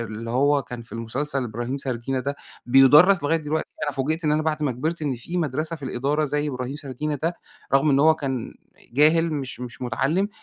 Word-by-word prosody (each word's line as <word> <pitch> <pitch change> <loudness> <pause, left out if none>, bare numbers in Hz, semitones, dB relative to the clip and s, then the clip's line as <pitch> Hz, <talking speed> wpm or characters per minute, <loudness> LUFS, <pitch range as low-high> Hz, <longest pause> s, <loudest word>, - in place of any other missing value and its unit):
آآ، - - -2
اللي 115 +1 -6
هو 140 +3 +3
كان 125 -1 -8
في 115 - -18
المُسلسل 130 +4 -2
إبراهيم 120 +3 -4
سردينة 130 0 -3
ده، 140 +2 -3 0.3
بيُدَرّس 145 +8 +7
لغاية 160 +3 +2
دلوقتي، 155 0 -2 0.2
أنا 145 - -2
فوجئت 155 +5 -2
إن 150 - +2
أنا 155 +1 +1
بعد 155 -1 -1
ما 140 - +1
كبرت، 160 +7 -3
إن 140 -4 -1
في 170 +9 -6
مدرسة 155 +1 -1
في 145 - -10
الإدارة 140 +4 0
زي 150 +1 -1
إبراهيم 125 +1 -4
سردينة 150 +1 -4
ده، 165 +2 0 0.4
رغم 140 +2 +4
إن 135 0 +4
هو 160 +2 +6
كان 135 -6 -4 0.4
جاهل 160 +5 +4
مش 135 -4 -4
مش 125 0 -7
مُتَعَلِّم، 155 +10 0
140 Hz, 205 wpm, -24 LUFS, 125-155 Hz, 0.4 s, بيُدَرّس